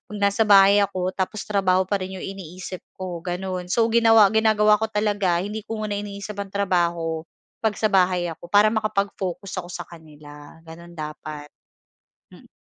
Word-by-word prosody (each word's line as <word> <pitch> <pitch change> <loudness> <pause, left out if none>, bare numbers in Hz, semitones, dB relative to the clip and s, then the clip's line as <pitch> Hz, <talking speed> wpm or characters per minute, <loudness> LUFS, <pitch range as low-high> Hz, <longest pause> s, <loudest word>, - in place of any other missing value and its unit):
nasa 205 +2 +1
bahay 200 0 +7
ako 185 -2 -1
tapos 190 +3 -3
trabaho 190 -2 +2
pa 195 +1 -1
rin 185 +1 -6
'yong 185 - -7
iniisip 185 -1 -7 0.2
ko 180 -2 -5
gano'n. 180 +1 -4
So 225 +5 +2
ginawa 225 -3 +6
ginagawa 215 -1 +4
ko 220 - -1
talaga 205 -4 0
hindi 210 +2 -4
ko 220 -1 -4
muna 205 -1 -2
iniisip 200 0 -7
ang 200 - -3
trabaho, 170 -4 0 0.3
'pag 220 -2 0
sa 215 0 0
bahay 180 -2 +2
ako 170 +2 -11
para 210 +3 +4
makapag-focus 200 -4 -2
ako 175 - -7
sa 175 0 -6
kanila 150 -3 -14
gano'n 170 +1 -12
dapat. 150 -1 -7 0.8
Mm. - - -17
190 Hz, 160 wpm, -23 LUFS, 175-210 Hz, 0.8 s, bahay